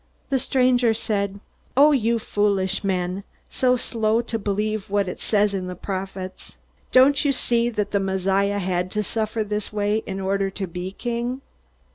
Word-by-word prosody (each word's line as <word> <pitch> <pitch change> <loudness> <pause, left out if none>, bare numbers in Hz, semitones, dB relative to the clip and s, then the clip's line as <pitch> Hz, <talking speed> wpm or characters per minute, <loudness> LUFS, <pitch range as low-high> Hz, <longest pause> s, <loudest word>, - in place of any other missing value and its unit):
The 265 - +3
stranger 250 -3 +3
said: 200 -2 -2 0.4
"O 295 +2 +7
you 235 -4 +2
foolish 200 -3 0
men 185 0 -1 0.3
so 250 -1 +3
slow 225 -2 +1
to 225 -1 -3
believe 210 0 -2
what 200 -1 +1
it 180 - -6
says 205 -1 +2
in 185 -2 -2
the 180 - -5
Prophets! 190 0 -6 0.4
Don't 270 +2 +5
you 285 - +3
see 240 -2 +1
that 210 -3 -2
the 200 - +2
Messiah 195 +1 +1
had 180 -2 -1
to 210 0 0
suffer 220 +1 -1
this 210 0 -3
way 210 0 +1
in 195 -1 -4
order 195 0 0
to 195 0 -4
be 180 +2 -6
King?" 240 +3 -3
205 Hz, 165 wpm, -23 LUFS, 195-230 Hz, 0.4 s, O